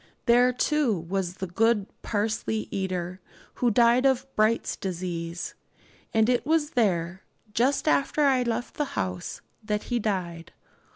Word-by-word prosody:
There, 245 +1 +5
too, 255 -3 +1
was 180 +2 -3
the 190 - -4
good 210 +3 +2 0.2
parsley 215 0 -1
eater, 185 -1 -3 0.4
who 245 - +4
died 235 +3 +4
of 265 -2 +3
Bright's 215 +2 +2
disease; 175 -2 -4 0.6
and 220 0 +3
it 245 -1 +2
was 310 +1 +1
there, 190 - 0 0.3
just 265 +7 +1
after 300 0 +2
I 270 -3 +4
left 240 0 -3
the 295 - +1
house, 90 -1 -3 0.2
that 210 -1 -1
he 240 - +2
died. 175 -6 -3
215 Hz, 135 wpm, -26 LUFS, 180-245 Hz, 0.6 s, There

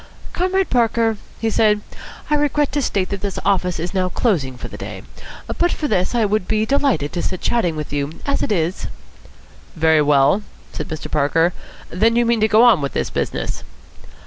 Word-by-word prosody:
"Comrade 375 +1 0
Parker," 230 -2 +2 0.2
he 225 -1 0
said, 210 -1 +3 0.5
"I - - -1
regret 295 -1 +1
to 290 +1 0
state 195 -7 -1
that 200 - -4
this 200 -2 -3
office 185 -3 +1
is 175 +3 -4
now 185 -2 0
closing 155 - 0
for - - -7
the - - -10
day. - - -7 0.4
But 345 0 0
for 300 - -2
this, 185 -1 0
I 235 - +3
should 205 -2 0
be 215 0 +1
delighted 270 - +1
to 175 - -2
sit 185 - -3
chatting 200 -9 +1
with 150 -1 -5
you. 145 +1 -2
As 280 - 0
it - - -1
is 175 -2 -1 0.4
" - - -26
"Very 160 -1 +5
well," 145 +5 +4 0.3
said - - -5
Mr. 155 -2 -6
Parker. 165 +4 +2 0.4
"Then 225 +6 +2
you 240 0 +3
mean 235 -1 +2
to 215 - +4
go 215 +2 +5
on 230 -10 +6
with 140 - -3
this - - -2
business?" - - -3
205 Hz, 200 wpm, -20 LUFS, 165-235 Hz, 0.5 s, on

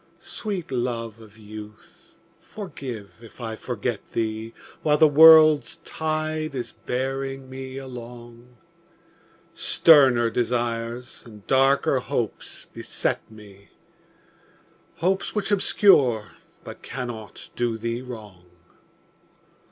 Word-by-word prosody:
Sweet 195 -9 -5
love 115 -3 -3
of 110 0 -16
youth, 105 0 -12 0.2
forgive 135 - -8
if 115 +1 -15
I 115 -2 -5
forget 120 -1 -4
thee 110 0 -2 0.3
While 150 -1 +3
the 155 - +7
world's 155 0 +7
tide 155 -1 -3
is 125 - -4
bearing 135 +1 -4
me 130 0 -7
along; 120 -2 -10 1.0
Sterner 130 -7 +5
desires 120 +1 -2
and 105 -4 -14
darker 135 0 +3
hopes 120 -3 -4
beset - - -2
me, 100 -2 -16 1.3
Hopes 190 +5 -1
which 210 -1 -1
obscure 140 - +4 0.3
but - - -10
cannot 120 -5 -7
do 120 -2 -1
thee 115 +2 -3
wrong. 105 -8 -10
125 Hz, 95 wpm, -24 LUFS, 115-140 Hz, 1.3 s, the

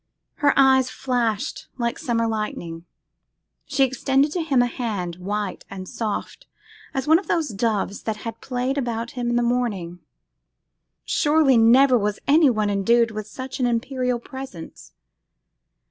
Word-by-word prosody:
her 290 -1 +4
eyes 265 -1 +5
flashed 240 -6 -2
like 235 -2 -2
summer 230 -2 0
lightning; 175 -7 -4 0.8
she 275 - +2
extended 270 +2 +1
to 350 - -1
him 290 -5 +1
a - - +2
hand 205 -8 -3
white 200 +2 -4
and 190 -1 -7
soft 225 - -4 0.4
as 265 0 -3
one 320 +2 +6
of 390 - -11
those 325 -4 0
doves 205 -2 -1
that 220 -1 -3
had 225 0 -6
played 260 +2 -2
about 235 -2 -3
him 245 -2 -3
in 240 - 0
the 240 - +2
morning. 215 -8 -1 1.1
Surely 295 -3 +3
never 245 +3 +6
was 205 0 -1
anyone 275 -8 +4
endued 230 +4 +3
with 215 -1 -6
such 260 +5 -7
an 250 - +2
imperial 250 +1 -1
presence. 230 - -10
240 Hz, 145 wpm, -23 LUFS, 210-265 Hz, 1.1 s, one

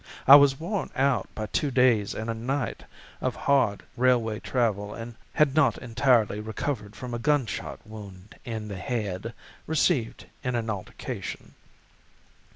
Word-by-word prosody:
I 135 - +11
was 140 -2 +6
worn 190 +5 -2
out 135 -6 +1
by 110 - -3
two 145 +6 -1
days 125 -6 +3
and 110 - -4
a 115 - -1
night 125 +2 -3 0.4
of - - -1
hard 130 -8 +2
railway 120 -3 +2
travel 105 -5 -1
and 115 +1 -7 0.2
had 150 -3 +3
not 155 -2 +3
entirely 115 -3 +2
recovered 110 0 -4
from 125 -1 -7
a 120 - -2
gunshot 140 -2 -1
wound 100 -2 -11
in 110 -2 -5
the 100 -2 -6
head, 105 +1 -3 0.3
received 150 -6 +1 0.2
in 125 -1 -1
an 115 -2 -1
altercation. 100 -3 -6
115 Hz, 145 wpm, -27 LUFS, 105-135 Hz, 0.4 s, I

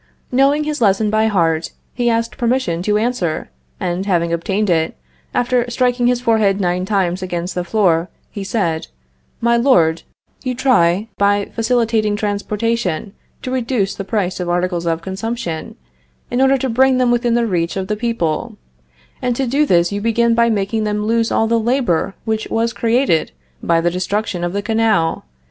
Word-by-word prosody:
Knowing 275 +4 +3
his 300 -2 -3
lesson 210 0 +3
by 220 0 +2
heart, 165 -6 0 0.2
he 240 -1 0
asked 230 0 -1
permission 235 -9 0
to 210 +3 +1
answer, 210 - -2 0.3
and, 180 +3 -2
having 170 -3 +1
obtained 195 +5 -1
it, 160 - 0 0.3
after 245 0 +1
striking 245 0 +1
his 245 0 +2
forehead 220 -5 +2
nine 180 -1 0
times 190 -2 0
against 180 -1 -3
the 180 - -2
floor, 175 -3 +1 0.2
he 200 - -5
said: 190 -6 -1 0.5
"My 235 0 +3
Lord, 170 -11 +3 0.4
you 255 -1 -2
try, 215 -6 +2
by 200 0 +2
facilitating 225 -2 +1
transportation, 205 -2 -2 0.3
to 255 - -4
reduce 235 -6 0
the 195 - -5
price 190 -2 -2
of 180 -1 -3
articles 175 -1 -1
of 165 0 -1
consumption, 190 -3 -4 0.6
in 245 - +1
order 270 0 +4
to 265 - -2
bring 260 +2 +3
them 250 -1 +2
within 240 -1 +1
the 235 0 +2
reach 175 -4 -1
of 190 - -2
the 210 - -1
people; 210 -9 -2 0.6
and 245 -1 0
to 270 - 0
do 280 +5 +1
this 175 0 +3
you 200 0 -3
begin 230 +1 +2
by 235 0 +3
making 215 +1 0
them 210 0 -1
lose 230 +1 +1
all 225 - +2
the 230 +1 +2
labor 225 -7 0
which 220 -1 -1
was 230 0 0
created 225 - +1 0.3
by 165 - +2
the 175 +1 +1
destruction 185 +1 -2
of 175 - -1
the 200 0 -2
canal. 220 - +1
215 Hz, 170 wpm, -18 LUFS, 180-235 Hz, 0.6 s, order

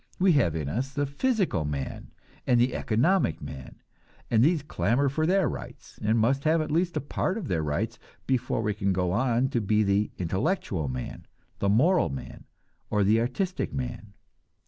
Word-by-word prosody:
We 185 0 +4
have 90 - +3
in 75 -3 -2
us 125 - -2
the 145 +1 -1
physical 190 - 0
man 70 -2 -4 0.4
and 120 -1 +4
the 125 +2 +2
economic 120 - +1
man, 65 -3 -9 0.6
and 115 0 +5
these 155 0 +3
clamor 140 -1 +1
for 155 +4 0
their 190 +1 +3
rights, - - -8
and 110 +2 +2
must 135 +5 +2
have 160 +1 +3
at 155 - -2
least 170 +3 +1
a - - 0
part 185 - -2
of 195 -9 -5
their 85 -7 0
rights, 75 -1 -2 0.3
before 125 -3 0
we 105 0 0
can 100 -1 0
go 90 -1 0
on 125 +4 +1
to 120 - 0
be 105 +1 +2
the 100 +1 +1
intellectual 95 - -1
man, 65 -1 -6 0.3
the 100 - +1
moral 160 - +4
man, 65 -2 -8 0.4
or 105 -1 +2
the 110 +3 +4
artistic 180 - -2
man. 120 -5 -5
120 Hz, 180 wpm, -27 LUFS, 100-150 Hz, 0.6 s, and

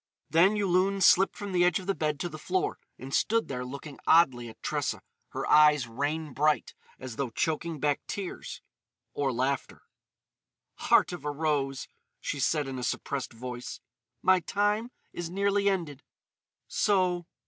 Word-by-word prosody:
Then 180 +6 +5
Yulun 195 0 +2
slipped 195 - +5
from 205 -1 -6
the 180 -1 +3
edge 180 -1 +3
of 185 - -7
the 195 - +1
bed 150 -4 -2
to 175 - -1
the 155 -2 -8
floor, 185 +4 -1 0.2
and 135 +1 -9
stood 230 +1 +2
there 125 -2 -4
looking 140 +3 -8
oddly 125 -8 +4
at 110 - -14
Tressa, - - -2 0.3
her - - -4
eyes 150 -4 +5
rain 145 +5 -3
bright 150 -1 +1 0.2
as 130 -3 -8
though 140 -3 -1
choking 160 +5 -2
back 145 +1 +1
tears—or 160 -6 -6
laughter. 130 +2 -2 1.1
"Heart - - +5
of 175 - -7
a 150 - -2
rose," 145 -3 -1 0.3
she 145 - -4
said 145 +2 +1
in 130 -1 -5
a - - -5
suppressed 135 +1 -3
voice, 125 +1 -7 0.4
"my 185 0 +5
time 205 +6 0 0.2
is 175 -1 -5
nearly 200 +2 +1
ended.... 165 -8 -3 0.7
So.... 180 -5 +1
155 Hz, 155 wpm, -28 LUFS, 135-185 Hz, 1.1 s, Then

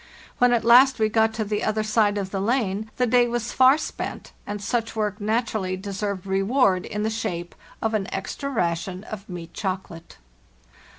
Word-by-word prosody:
When 245 0 +5
at 235 -2 +1
last 255 +3 +7
we 220 -2 +2
got 220 0 +3
to 220 - -1
the 210 0 -2
other 215 0 0
side 215 -1 +2
of 195 -2 -3
the 195 - -2
lane 215 -2 0
the 250 - +3
day 245 0 +4
was 240 -1 -2
far 260 +2 +6
spent, - - -6 0.2
and 205 0 -4
such 230 +2 -2
work 210 -1 -2
naturally 215 -3 -1
deserved 200 0 -4
reward 195 0 +2
in 210 0 -3
the 220 - 0
shape 175 -6 -4 0.3
of 225 0 0
an 205 -3 -1
extra 275 +8 -4
ration 180 -4 -2
of 210 -2 -8
meat 170 -2 -8
chocolate. 185 -4 -5
215 Hz, 180 wpm, -24 LUFS, 195-230 Hz, 0.3 s, last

